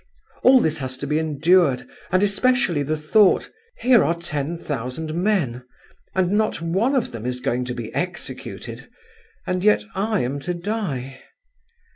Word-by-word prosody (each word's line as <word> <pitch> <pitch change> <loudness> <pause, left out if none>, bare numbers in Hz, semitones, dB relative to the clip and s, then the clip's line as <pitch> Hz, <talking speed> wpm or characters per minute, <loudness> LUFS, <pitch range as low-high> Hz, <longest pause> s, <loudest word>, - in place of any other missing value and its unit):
All 260 0 +7
this 160 -7 0
has 130 -1 -4
to 140 - -5
be 150 +2 +1
endured, 160 -2 +2 0.2
and 185 +2 +3
especially 205 -5 +2
the 155 +2 -1
thought: 185 +7 +3 0.3
'Here 245 -1 +5
are 170 +4 +1
ten 165 -1 -3
thousand 145 +1 -4
men, 170 - 0 0.5
and 185 -1 +2
not 215 +1 +1
one 190 +11 +1
of 255 - 0
them 115 -2 -7
is 125 0 -3
going 125 -1 -1
to 125 0 -4
be 115 -2 -6
executed, 175 -1 -5 0.6
and 185 0 -1
yet 210 - +4
I 210 +1 0
am 135 +4 -2
to 175 +5 -3
die. 170 - -4
165 Hz, 155 wpm, -22 LUFS, 135-200 Hz, 0.6 s, All